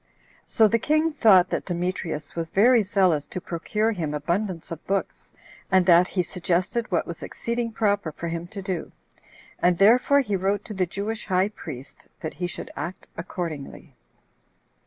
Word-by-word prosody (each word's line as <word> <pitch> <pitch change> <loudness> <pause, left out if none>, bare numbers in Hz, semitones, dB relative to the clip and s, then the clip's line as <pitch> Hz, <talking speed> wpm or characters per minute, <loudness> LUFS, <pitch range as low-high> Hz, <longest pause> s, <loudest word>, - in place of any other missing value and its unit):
So 220 - +4
the 230 +3 +2
king 310 +5 +2
thought 210 -11 +5
that - - -2
Demetrius 175 -4 -3
was 165 -1 -3
very 235 +6 +5
zealous 185 -7 +2
to - - -5
procure 210 +6 -1
him 160 -8 -3
abundance 170 +4 -2
of 165 - -6
books, 195 0 -3 0.4
and 190 -1 +5
that 175 0 +6
he 185 -2 0
suggested 180 +6 -1
what 170 - +1
was 170 - -7
exceeding 235 0 -3
proper 205 -6 0
for 170 +3 -6
him 170 +1 -4
to 195 +1 -8
do; 185 -4 -4 0.7
and 180 -1 +3
therefore 250 +8 +5
he 210 -7 -2
wrote 195 +2 0
to 215 - -6
the 185 -2 0
Jewish 210 +5 -4
high 190 0 +2
priest, 135 - -10
that 160 - -4
he 180 - -3
should 175 - -7
act 180 +2 -6
accordingly. 165 -4 -6
185 Hz, 165 wpm, -25 LUFS, 170-210 Hz, 0.7 s, that